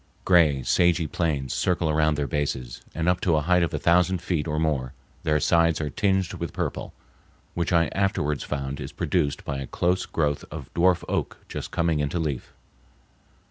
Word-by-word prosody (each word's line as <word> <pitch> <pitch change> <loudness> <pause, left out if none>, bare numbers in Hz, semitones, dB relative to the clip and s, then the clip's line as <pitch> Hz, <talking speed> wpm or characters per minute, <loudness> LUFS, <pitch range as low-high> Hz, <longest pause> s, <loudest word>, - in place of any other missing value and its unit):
Gray, 80 -7 +4
sagey 85 +2 +3
plains 75 -5 -1
circle 90 -2 +1
around 80 0 +2
their 75 0 -1
bases, 65 -3 -3
and 80 +1 -1
up 90 0 +2
to 85 -4 +2
a 75 - +2
height 90 +3 +3
of 85 - +1
a - - -2
thousand 90 +1 +3
feet 85 -3 -2
or 75 -1 -1
more 75 -5 0 0.3
their 75 -1 +1
sides 85 0 +3
are 75 -2 -3
tinged 95 -1 +1
with - - -5
purple, - - -3 0.6
which 85 0 -1
I 85 -1 +4
afterwards 75 -7 0
found 70 -1 -4
is - - -6
produced 75 -7 -1
by 70 -1 -3
a 70 - -5
close 90 +1 0
growth 75 -3 -1
of 75 -3 -9
dwarf 85 0 +3
oak - - -2
just - - -6
coming 85 -3 0
into 75 +4 -1
leaf. 75 -6 -3
80 Hz, 180 wpm, -25 LUFS, 75-85 Hz, 0.6 s, Gray